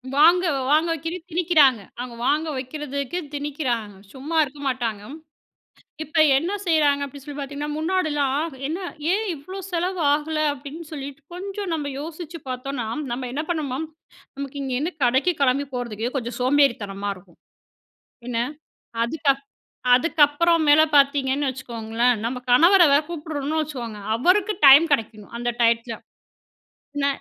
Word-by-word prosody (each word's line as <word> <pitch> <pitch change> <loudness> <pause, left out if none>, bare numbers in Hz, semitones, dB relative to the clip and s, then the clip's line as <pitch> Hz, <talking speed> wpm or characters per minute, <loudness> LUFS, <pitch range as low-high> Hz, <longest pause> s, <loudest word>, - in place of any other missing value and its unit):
வாங்க 340 +5 +6 0.3
வாங்க 310 +3 +4
வைக்க 325 +1 -4 0.2
திணிக்கிறாங்க. 310 - +4 0.2
அவங்க 245 -1 -6
வாங்க 310 +2 +1
வைக்கிறதுக்கு 280 +3 -4
திணிக்கறாங்க. 260 -8 -3 0.2
சும்மா 290 +5 -6
இருக்க 285 +1 -8
மாட்டாங்க. 235 -5 -2 1.0
இப்ப 310 +1 +3
என்ன 340 +7 -1
செய்யறாங்க 295 -4 +3
அப்படினு 275 0 -11
சொல்லி 290 -1 -8
பாத்தீங்கன்னா, 285 +2 -5
முன்னாடிலாம் 310 -4 0
என்ன 330 +5 -3 0.3
ஏன் 430 +3 +1
இவ்ளோ 370 +7 -9
செலவு 355 +1 -1
ஆகல 305 +1 -1
அப்படின்னு 285 +4 -9
சொல்லிட்டு 280 -2 -7
கொஞ்சம் 390 +1 -5
நம்ம 295 -3 -2
யோசிச்சு 330 +2 -7
பார்த்தோம்னா, 255 -1 -4 0.3
நாம 250 +1 -3
என்ன 305 +3 -2
பண்ணுவோம். 305 -2 -2 0.5
நமக்கு 280 0 -6
இங்க 260 -1 -3
என்ன 325 - 0
கடைக்குக் 270 +7 +2
கெளம்பி 275 +1 +2
போறதுக்கு 240 0 -4
கொஞ்சம் 240 -1 -4
சோம்பேறித்தனமா 235 -8 +1
இருக்கும். 180 -2 -19 0.9
என்ன 230 -2 -1 0.7
அதுக்கப் 275 +1 0 0.5
அதுக்கப்புறம் 320 +3 +3
மேல 300 +2 +7
பாத்தீங்கன்னு 280 0 +3
வச்சுக்கோங்களேன். 235 -1 -1
நம்ம 250 +2 -2
கணவர 345 +9 +7
வேற 285 - +6
கூப்பிடுறோம்னு 315 -2 -3
வச்சுக்கோங்க. 240 -8 -5
அவருக்கு 370 - +3
டைம் 280 +5 +9
கிடைக்கணும். 215 -5 -2
அந்த 240 0 -1
டையத்துல, 230 0 +2 1.0
என்ன 280 -1 +1
285 Hz, 130 wpm, -23 LUFS, 250-315 Hz, 1.0 s, டைம்